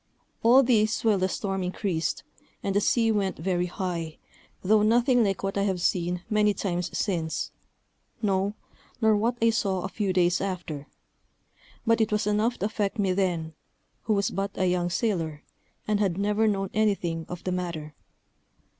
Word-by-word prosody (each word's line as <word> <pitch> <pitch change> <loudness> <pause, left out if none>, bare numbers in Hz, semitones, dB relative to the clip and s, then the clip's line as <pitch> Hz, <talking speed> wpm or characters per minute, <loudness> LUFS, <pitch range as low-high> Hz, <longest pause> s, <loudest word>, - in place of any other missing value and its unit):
All 250 +4 +6
this 225 -3 +2
while 210 -3 +4
the 185 +1 +1
storm 195 0 -2
increased, 180 -2 -2 0.4
and 195 - -1
the 205 - +4
sea 225 +1 +3
went 200 -3 0
very 180 +1 0
high, 170 -3 -4 0.5
though 210 +3 +4
nothing 240 +3 +4
like 195 -2 -1
what 195 0 -1
I - - +2
have 195 -2 0
seen 175 0 0
many 210 -1 +2
times 180 -3 -2
since; 165 -6 -1 0.7
no, 200 -1 0 0.4
nor 220 -2 +4
what 230 +4 0
I 230 - +5
saw 195 -5 0
a - - -1
few 200 -1 -1
days 175 -1 +2
after; 170 -7 -4 1.0
but 230 -1 +3
it 220 - +1
was 210 -1 +1
enough 210 +3 +1
to - - -2
affect 210 0 -1
me 195 -3 +1
then, 175 -4 -1 0.5
who 215 - +2
was 200 -1 0
but 195 +1 -2
a 190 - +1
young 180 -1 +1
sailor, 170 -7 -1 0.4
and 210 -1 +1
had 190 -4 +1
never 210 +2 +2
known 195 -2 -1
anything 190 -6 0
of 180 0 -7
the 185 - -2
matter. 170 -4 -4
195 Hz, 170 wpm, -27 LUFS, 180-215 Hz, 1.0 s, All